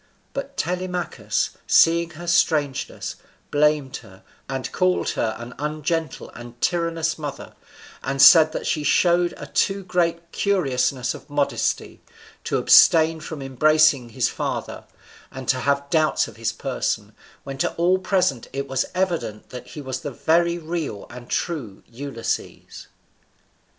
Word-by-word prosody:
But 275 Hz, 0 st, -6 dB
Telemachus, 180 Hz, 0 st, -2 dB, 0.2 s
seeing 170 Hz, 0 st, +4 dB
her 175 Hz, -, -8 dB
strangeness, 150 Hz, -5 st, 0 dB, 0.3 s
blamed 150 Hz, -2 st, +2 dB
her, 95 Hz, -5 st, -16 dB, 0.3 s
and 135 Hz, -1 st, -4 dB
called 185 Hz, -1 st, +1 dB
her 110 Hz, -1 st, -1 dB
an 120 Hz, +1 st, -9 dB
ungentle 155 Hz, +1 st, -3 dB
and 120 Hz, 0 st, -11 dB
tyrannous 165 Hz, -1 st, 0 dB
mother; 145 Hz, -2 st, -7 dB, 0.5 s
and 135 Hz, +1 st, -3 dB
said 155 Hz, +3 st, +8 dB
that -, -, -5 dB
she 150 Hz, -, 0 dB
showed 175 Hz, +4 st, +3 dB
a -, -, -7 dB
too 195 Hz, 0 st, 0 dB
great 170 Hz, -2 st, -1 dB
curiousness 135 Hz, -9 st, 0 dB
of -, -, -12 dB
modesty, 145 Hz, -1 st, -1 dB, 0.4 s
to -, -, 0 dB
abstain 160 Hz, 0 st, +6 dB
from 155 Hz, -2 st, -7 dB
embracing 145 Hz, -1 st, +3 dB
his 110 Hz, -, 0 dB
father, -, -, -4 dB, 0.5 s
and 130 Hz, -1 st, -8 dB
to 130 Hz, -, +2 dB
have 140 Hz, +2 st, 0 dB
doubts 155 Hz, -2 st, +2 dB
of -, -, -12 dB
his -, -, -2 dB
person, -, -, -3 dB, 0.3 s
when 135 Hz, -1 st, -7 dB
to -, -, +1 dB
all 180 Hz, +2 st, +2 dB
present 185 Hz, -, 0 dB
it 140 Hz, 0 st, -4 dB
was 130 Hz, -1 st, -1 dB
evident 170 Hz, -, -2 dB
that 125 Hz, -, -8 dB
he 150 Hz, -, -8 dB
was 130 Hz, -1 st, -4 dB
the 145 Hz, -, -5 dB
very 170 Hz, +5 st, +1 dB
real 160 Hz, -10 st, -4 dB
and 120 Hz, 0 st, -11 dB
true 130 Hz, -, -3 dB
Ulysses. 120 Hz, -1 st, -5 dB
155 Hz, 140 wpm, -23 LUFS, 130-170 Hz, 0.5 s, said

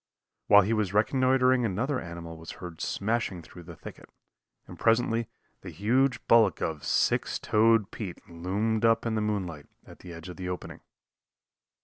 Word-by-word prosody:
While 100 Hz, 0 st, +7 dB
he 105 Hz, +4 st, 0 dB
was 105 Hz, -3 st, -1 dB
reconnoitering 130 Hz, +3 st, +3 dB
another 120 Hz, +6 st, -1 dB
animal 85 Hz, -1 st, -8 dB
was 80 Hz, 0 st, -9 dB
heard 85 Hz, -3 st, -9 dB
smashing 100 Hz, -4 st, -2 dB
through 90 Hz, -, -13 dB
the 85 Hz, 0 st, -11 dB
thicket, -, -, -12 dB, 0.6 s
and -, -, -12 dB
presently 115 Hz, 0 st, +1 dB, 0.3 s
the 95 Hz, -, -8 dB
huge 120 Hz, -, +1 dB
bulk 110 Hz, -5 st, +4 dB
of 80 Hz, -3 st, -3 dB
Six -, -, +1 dB
Toed 110 Hz, -1 st, +2 dB
Pete 95 Hz, -6 st, -7 dB
loomed 100 Hz, +7 st, -2 dB
up 115 Hz, 0 st, +3 dB
in 115 Hz, -, -1 dB
the 110 Hz, -, 0 dB
moonlight 95 Hz, -8 st, -3 dB, 0.2 s
at -, -, -15 dB
the 90 Hz, -, -11 dB
edge 85 Hz, +1 st, -9 dB
of 90 Hz, -, -9 dB
the 90 Hz, -1 st, -5 dB
opening. 90 Hz, -, -6 dB
105 Hz, 160 wpm, -28 LUFS, 90-115 Hz, 0.6 s, While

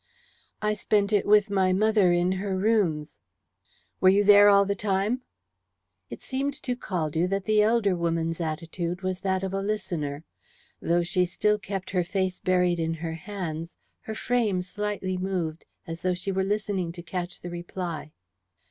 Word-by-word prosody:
"I 210 Hz, 0 st, +2 dB
spent 210 Hz, 0 st, +1 dB
it 205 Hz, -, +2 dB
with 210 Hz, 0 st, +5 dB
my 190 Hz, -2 st, +3 dB
mother 210 Hz, -2 st, +4 dB
in 175 Hz, +1 st, +2 dB
her 190 Hz, 0 st, -2 dB
rooms." 185 Hz, -8 st, +1 dB, 0.8 s
"Were 185 Hz, -, +6 dB
you 200 Hz, +2 st, +4 dB
there 205 Hz, 0 st, +8 dB
all 200 Hz, 0 st, +6 dB
the 200 Hz, -, 0 dB
time?" 200 Hz, +5 st, 0 dB, 0.9 s
It -, -, -9 dB
seemed 275 Hz, +1 st, -2 dB
to 250 Hz, -, -1 dB
Caldew 170 Hz, -6 st, -1 dB
that 195 Hz, 0 st, -1 dB
the 215 Hz, -1 st, +4 dB
elder 210 Hz, -3 st, +3 dB
woman's 165 Hz, 0 st, -1 dB
attitude 170 Hz, +3 st, -3 dB
was 185 Hz, -1 st, -2 dB
that 190 Hz, -1 st, -1 dB
of 190 Hz, 0 st, -3 dB
a 195 Hz, -, -1 dB
listener. 175 Hz, -8 st, -3 dB, 0.6 s
Though 175 Hz, +1 st, +2 dB
she 180 Hz, +1 st, +1 dB
still 210 Hz, +4 st, +1 dB
kept 195 Hz, -2 st, -5 dB
her 180 Hz, -2 st, +1 dB
face 185 Hz, +1 st, -2 dB
buried 180 Hz, -1 st, +2 dB
in 165 Hz, 0 st, -1 dB
her 165 Hz, 0 st, -4 dB
hands, 165 Hz, -2 st, -6 dB, 0.2 s
her 220 Hz, -, -7 dB
frame 220 Hz, -7 st, 0 dB
slightly 195 Hz, -1 st, -3 dB
moved, 180 Hz, -4 st, -3 dB, 0.2 s
as 165 Hz, 0 st, -7 dB
though 185 Hz, -1 st, +1 dB
she 190 Hz, +2 st, -3 dB
were 190 Hz, 0 st, 0 dB
listening 200 Hz, -3 st, -1 dB
to 175 Hz, -1 st, -9 dB
catch 180 Hz, 0 st, -5 dB
the 175 Hz, -, -7 dB
reply. 175 Hz, -2 st, -5 dB
185 Hz, 165 wpm, -26 LUFS, 175-205 Hz, 0.9 s, there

